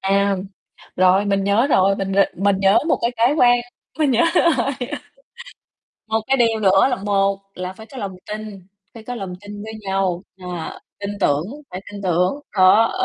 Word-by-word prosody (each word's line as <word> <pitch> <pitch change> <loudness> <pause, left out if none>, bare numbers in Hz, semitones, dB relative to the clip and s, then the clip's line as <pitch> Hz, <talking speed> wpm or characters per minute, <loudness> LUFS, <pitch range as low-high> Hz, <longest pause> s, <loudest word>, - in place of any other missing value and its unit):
À, 200 +1 +2 0.6
rồi, 185 +2 +4
mình 195 -1 0
nhớ 205 +6 +3
rồi, 195 -7 +3
mình 195 0 -3
g 195 - 0 0.2
mình 200 +1 +1
nhớ 195 +1 +5
một - - +2
cái 235 - +2
cái 240 +6 +3
quan 245 -4 +5 0.4
mình 300 -3 +2
nhớ 240 +4 +3
rồi. 335 -5 +3 1.4
Một 220 0 +1
cái 270 - +2
điều 230 -3 +2
nữa 195 +2 +4
là - - 0
một 195 0 +1 0.2
là 180 0 -5
phải 220 +3 -13
có 270 - -13
lòng 195 -4 -5
tin, 210 -3 -7 0.3
phải 225 - -10
có 245 - -5
lòng 195 -6 -6
tin 205 0 -9
với 220 - -7
nhau, 190 -2 -1 0.2
ờ, 175 -2 -6 0.2
tin 200 0 -3
tưởng, 145 -4 +2 0.3
phải 180 - -6
tin 205 -1 -8
tưởng. 180 0 +2 0.2
Đó 190 +5 +5
200 Hz, 185 wpm, -20 LUFS, 190-225 Hz, 1.4 s, nhớ